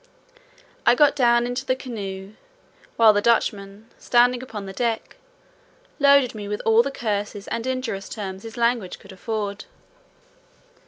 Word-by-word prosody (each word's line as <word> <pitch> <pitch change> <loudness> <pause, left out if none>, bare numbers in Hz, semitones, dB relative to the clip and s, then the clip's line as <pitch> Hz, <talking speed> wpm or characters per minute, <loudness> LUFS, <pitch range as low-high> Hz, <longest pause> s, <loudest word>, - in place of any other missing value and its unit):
I 240 - +5
got 290 +1 +4
down 240 -3 +3
into 245 +1 -3
the 255 -1 0
canoe, 200 -6 -7 0.6
while 225 -2 +6
the 205 - +1
Dutchman, 205 -2 0
standing 245 0 +3
upon 220 -6 -7
the 195 - -8
deck, 230 +1 -2 0.8
loaded 280 -3 +5
me 210 -2 -7
with 210 0 -3
all 225 +1 +5
the 270 - -2
curses 210 -5 -3
and 230 +2 -3
injurious 235 -7 -3
terms 190 -3 -6
his 225 +1 -10
language 235 -5 0
could - - -15
afford. 205 +1 -4
225 Hz, 145 wpm, -23 LUFS, 205-245 Hz, 0.8 s, while